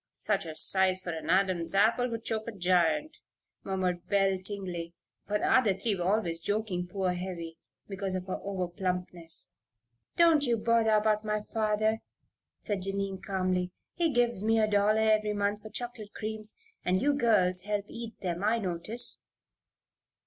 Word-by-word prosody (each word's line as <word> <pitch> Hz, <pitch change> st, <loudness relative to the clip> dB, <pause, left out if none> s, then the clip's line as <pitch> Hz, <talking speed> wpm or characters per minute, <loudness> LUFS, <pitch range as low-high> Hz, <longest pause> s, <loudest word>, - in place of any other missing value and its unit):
"Such 200 Hz, -5 st, -1 dB
a 160 Hz, -, -6 dB
size 190 Hz, +2 st, +2 dB
for 185 Hz, -2 st, -5 dB
an 160 Hz, 0 st, -5 dB
Adam's 185 Hz, -2 st, +2 dB
apple 230 Hz, +5 st, +3 dB
would 230 Hz, -1 st, -5 dB
choke 220 Hz, 0 st, -2 dB
a -, -, -2 dB
giant," 185 Hz, -, +1 dB, 0.4 s
murmured 185 Hz, -2 st, -2 dB
Belle 195 Hz, -2 st, +2 dB
Tingley, 180 Hz, -4 st, -4 dB, 0.3 s
for 210 Hz, +1 st, +1 dB
the 210 Hz, -3 st, +3 dB
three 215 Hz, +2 st, +1 dB
were 175 Hz, -2 st, -3 dB
always 170 Hz, -7 st, -1 dB
joking 195 Hz, -1 st, -2 dB
poor 185 Hz, 0 st, -1 dB
Heavy 175 Hz, -2 st, -5 dB, 0.3 s
because 195 Hz, -1 st, -3 dB
of 185 Hz, -1 st, -3 dB
her 185 Hz, -, -3 dB
over 190 Hz, -2 st, -2 dB
plumpness. 180 Hz, -2 st, -5 dB, 0.7 s
"Don't 330 Hz, -4 st, +6 dB
you 240 Hz, -4 st, +2 dB
bother 230 Hz, 0 st, +3 dB
about 215 Hz, 0 st, +2 dB
my 210 Hz, -1 st, -1 dB
father," 215 Hz, 0 st, +1 dB, 0.6 s
said 205 Hz, -3 st, -2 dB
Jennie, 195 Hz, 0 st, -1 dB
calmly. 185 Hz, -2 st, 0 dB, 0.2 s
"He 335 Hz, -3 st, +1 dB
gives 240 Hz, -5 st, +1 dB
me 225 Hz, +1 st, +3 dB
a 215 Hz, -, +3 dB
dollar 210 Hz, +1 st, +3 dB
every 215 Hz, -1 st, +3 dB
month 205 Hz, 0 st, 0 dB
for 215 Hz, -, -9 dB
chocolate 225 Hz, -1 st, -6 dB
creams, 215 Hz, 0 st, -3 dB, 0.3 s
and 185 Hz, +1 st, +2 dB
you 285 Hz, +5 st, +2 dB
girls 205 Hz, -9 st, +3 dB
help 205 Hz, -1 st, -1 dB
eat 230 Hz, 0 st, -8 dB
them, 175 Hz, 0 st, -2 dB
I 225 Hz, +3 st, +3 dB
notice." 200 Hz, +3 st, -4 dB
200 Hz, 160 wpm, -30 LUFS, 185-220 Hz, 0.7 s, Don't